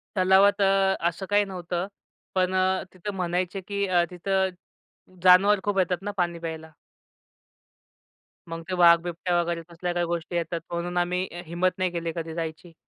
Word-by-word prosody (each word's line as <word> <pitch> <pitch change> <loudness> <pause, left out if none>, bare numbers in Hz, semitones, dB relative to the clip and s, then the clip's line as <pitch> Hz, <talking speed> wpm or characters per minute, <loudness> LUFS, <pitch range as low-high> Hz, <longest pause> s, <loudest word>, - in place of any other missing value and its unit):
तलावात 190 +2 +4
अ, 195 0 +3
असं 185 +3 -7
काही 205 0 +3
नव्हतं 180 -1 -4 0.5
पण 185 0 +1
अ, 185 0 +1
तिथं 200 +3 -6
म्हणायचे, 180 +1 -2
की 200 +1 -2
अ, 175 -2 +3
तिथं 190 +2 0 0.7
जानवर 190 +3 +6
खूप 205 -1 -1
येतात 180 0 0
ना 205 +1 -4
पाणी 170 -1 -1
प्यायला. 160 -1 -7 1.8
मग 165 0 -6
ते - - -2
वाघ, 170 -1 +7
बिबट्या 175 0 -1
वगैरे 170 0 -2
कसल्या 175 +1 -4
काही 175 0 0
गोष्टी 170 +1 -4
येतात 170 0 -2
म्हणून 175 +1 -3
आम्ही 180 +1 0
अ, 175 +1 -7
हिम्मत 175 +3 0
नाही 185 -1 0
केली 170 -1 -3
कधी 165 -1 -5
जायची. 165 +1 -6
180 Hz, 165 wpm, -26 LUFS, 170-190 Hz, 1.8 s, वाघ